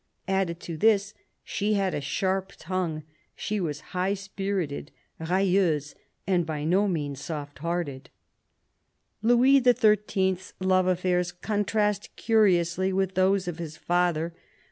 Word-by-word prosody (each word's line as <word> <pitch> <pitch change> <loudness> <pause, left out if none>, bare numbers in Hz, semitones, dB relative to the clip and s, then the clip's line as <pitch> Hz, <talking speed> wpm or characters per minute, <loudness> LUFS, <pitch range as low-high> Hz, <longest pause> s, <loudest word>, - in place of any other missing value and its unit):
Added 190 -3 0
to 165 -2 -6
this, 210 +1 +3 0.3
she 210 +1 -1
had 195 -2 0
a - - -2
sharp 190 +6 -1
tongue; 170 -3 -3 0.3
she 210 0 -2
was 150 -5 -3
high 185 +2 +1
spirited, 195 -6 -4 0.2
" - - -20
railleuse," 180 -6 +2 0.3
and 180 -2 +2
by 155 -2 -4
no 185 +6 +2
means 145 -6 -2
soft 145 -3 -6
hearted. 165 -5 -3 1.1
Louis 245 +4 +5
XIII.'s 210 -6 +2
love 185 0 +2
affairs 180 -1 +1
contrast 210 +2 -1
curiously 190 -4 +2
with 190 0 0
those 190 0 +2
of 175 -1 -4
his 155 -2 -6
father. 170 -1 0
185 Hz, 125 wpm, -27 LUFS, 170-200 Hz, 1.1 s, Louis